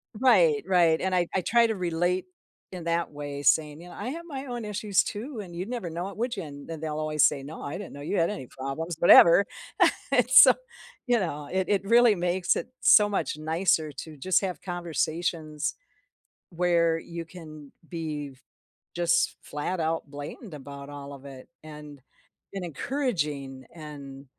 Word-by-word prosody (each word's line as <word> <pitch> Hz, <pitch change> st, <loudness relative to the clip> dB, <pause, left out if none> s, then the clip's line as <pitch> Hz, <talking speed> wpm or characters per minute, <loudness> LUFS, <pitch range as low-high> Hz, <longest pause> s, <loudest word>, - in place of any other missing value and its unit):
Right, 190 Hz, -, +4 dB
right, 175 Hz, -4 st, +3 dB
and 190 Hz, 0 st, -1 dB
I 175 Hz, -2 st, +2 dB
I 190 Hz, -, +1 dB
try 230 Hz, +6 st, +3 dB
to 220 Hz, -, -2 dB
relate 175 Hz, 0 st, -1 dB, 0.5 s
in 180 Hz, -2 st, -7 dB
that 170 Hz, 0 st, -1 dB
way, 145 Hz, -1 st, -6 dB
saying, 150 Hz, +1 st, +2 dB
"You 180 Hz, -, -12 dB
know, -, -, -11 dB
I 250 Hz, -, -5 dB
have 335 Hz, +4 st, -6 dB
my 275 Hz, -3 st, -6 dB
own 240 Hz, -3 st, -5 dB
issues, 210 Hz, -1 st, +1 dB
too, 225 Hz, +3 st, -6 dB
and 180 Hz, -4 st, -8 dB
you'd 185 Hz, +5 st, -5 dB
never 235 Hz, -9 st, -4 dB
know 175 Hz, +4 st, -4 dB
it, -, -, -12 dB
would 240 Hz, +1 st, -2 dB
ya?" 190 Hz, -5 st, -5 dB
And 145 Hz, 0 st, -11 dB
and 160 Hz, -1 st, -6 dB
they'll 155 Hz, -1 st, -3 dB
always 155 Hz, -1 st, +1 dB
say, 135 Hz, -, +3 dB
"No, 150 Hz, +4 st, -9 dB
I 145 Hz, -, -5 dB
didn't 200 Hz, -1 st, -8 dB
know 145 Hz, -, -9 dB
you 175 Hz, +7 st, -2 dB
had 165 Hz, -, +2 dB
any 135 Hz, -12 st, -6 dB
problems, 135 Hz, +7 st, -5 dB
whatever." 170 Hz, +2 st, +8 dB, 0.7 s
And -, -, +3 dB
so, -, -, +9 dB, 0.5 s
you 245 Hz, -2 st, +2 dB
know, 150 Hz, -6 st, -4 dB
it 190 Hz, 0 st, -1 dB
it 200 Hz, -2 st, +2 dB
really 230 Hz, 0 st, +5 dB
makes 175 Hz, +1 st, +1 dB
it -, -, -3 dB
so 210 Hz, -3 st, +7 dB
much 195 Hz, -5 st, -2 dB
nicer 160 Hz, 0 st, +1 dB
to 150 Hz, +2 st, -9 dB
just 185 Hz, +6 st, +2 dB
have 185 Hz, -3 st, -4 dB
conversations, 165 Hz, -3 st, -2 dB, 0.7 s
where 170 Hz, -1 st, +2 dB
you 170 Hz, 0 st, -7 dB
can 155 Hz, -4 st, -12 dB, 0.2 s
be 150 Hz, -4 st, -5 dB
f 130 Hz, -, -23 dB, 0.6 s
just 170 Hz, 0 st, +1 dB
flat 160 Hz, +5 st, -4 dB
out 160 Hz, -2 st, -2 dB
blamed 145 Hz, -, -8 dB
about 140 Hz, -1 st, -9 dB
all 145 Hz, -1 st, -8 dB
of 140 Hz, 0 st, -12 dB
it, 135 Hz, -2 st, -11 dB, 0.2 s
and 150 Hz, -3 st, -11 dB, 0.5 s
been 195 Hz, -2 st, -5 dB
encouraging 150 Hz, -, -3 dB
and 140 Hz, -4 st, -10 dB
170 Hz, 180 wpm, -27 LUFS, 150-190 Hz, 0.7 s, so